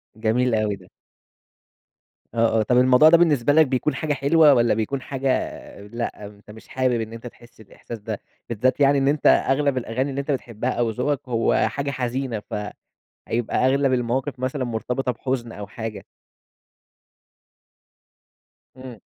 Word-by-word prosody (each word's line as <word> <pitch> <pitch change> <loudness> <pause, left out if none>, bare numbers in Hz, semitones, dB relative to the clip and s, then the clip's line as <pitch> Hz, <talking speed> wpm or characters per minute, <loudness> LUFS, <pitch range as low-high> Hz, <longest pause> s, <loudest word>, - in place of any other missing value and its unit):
جميل 115 +2 +1
أوي 105 -2 0
ده. - - -18 1.4
آه، 115 -1 +2
آه. - - +2
طَب 125 +3 +2
الموضوع 130 +5 +6
ده 170 - +7
بالنسبة 145 -5 +3
لك 160 0 +6
بيكُون 130 +4 -1
حاجة 155 -1 -1
حلوة 145 +2 +5
والّا 120 -2 +3
بيكُون 115 +5 -2
حاجة 135 0 -3
آآ، 100 -4 -5
لأ 115 -1 -5
أنت 105 +1 -13
مش 110 +1 -14
حابب 130 -3 0
إن 110 0 -6
أنت 115 +1 -8
تحس 120 -1 -16
الإحساس 110 +2 -10
ده، 105 0 -6 0.3
بالذات 120 +4 0
يعني 140 0 +4
إن 135 0 +1
أنت 145 +1 +2
أغلَب 140 0 +3
الأغاني 125 +3 -2
اللي 135 - -4
أنت 140 +1 -3
بتحبها 120 -2 -3
أو 120 -2 0
ذوقك 125 +5 -1
هو 115 -1 +2
حاجة 140 0 -3
حزينة 125 -3 -3 0.7
فهيبقى 120 +2 -2
أغلَب 135 0 +2
المواقِف 125 +3 -1
مثلًا 130 +1 -2
مرتبِطة 125 +2 -2
بحُزن 120 -1 -4
أو 105 -2 -8
حاجة؟ 110 +1 -7 2.7
إمم. 130 -4 -10
125 Hz, 155 wpm, -23 LUFS, 115-135 Hz, 2.7 s, ده